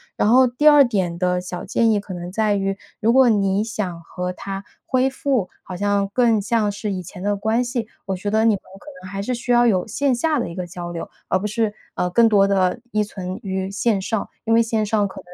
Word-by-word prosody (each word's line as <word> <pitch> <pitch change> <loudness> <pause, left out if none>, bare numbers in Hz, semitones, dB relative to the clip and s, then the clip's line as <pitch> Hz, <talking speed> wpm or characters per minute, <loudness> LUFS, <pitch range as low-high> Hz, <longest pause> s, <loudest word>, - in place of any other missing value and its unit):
然 210 - +2
后 255 +2 +6
第 250 +5 +1
二 295 -1 +8
点 185 -7 -1
的 180 -1 +1
小 180 0 -6
建 230 -1 +2
议 210 - +2
可 200 -1 -8
能 175 0 -6
在 215 0 +1
于， 195 0 -1 0.2
如 225 +2 +3
果 265 0 +6
你 200 -2 +2
想 190 -6 -4
和 180 +2 -4
她 195 +1 -6 0.2
恢 260 0 +2
复， 260 -7 -1
好 185 - -7
像 200 +1 +1
更 230 -3 +3
像 215 -1 +1
是 205 0 -4
以 185 - -4
前 180 +2 -10
的 205 +1 0
关 220 +4 0
系， 240 -2 -3 0.2
我 195 -1 -2
觉 205 +3 -4
得 220 +1 +3
你 225 - +5
们 200 - -1 0.2
可 - - -19 0.2
能 185 - -9
还 195 0 -3
是 250 +4 -2
需 245 +1 -3
要 240 0 +5
有 185 -5 +2
线 265 +4 0
下 305 +4 +1
的 235 - -2
一 170 - -8
个 180 -1 -4
交 175 -1 -7
流， 165 - -6 0.2
而 185 - +2
不 200 - -5
是， 220 -1 -1 0.2
呃， 180 - 0
更 230 +5 +4
多 200 -2 +4
地 195 +2 +1
依 215 0 +1
存 185 -2 -6
于 190 0 -3
线 200 0 0
上， 215 +2 -2 0.2
因 225 - +2
为 230 0 +5
线 220 -1 0
上 210 -1 +1
可 - - -10
205 Hz, 260 characters per minute, -21 LUFS, 190-230 Hz, 0.2 s, 二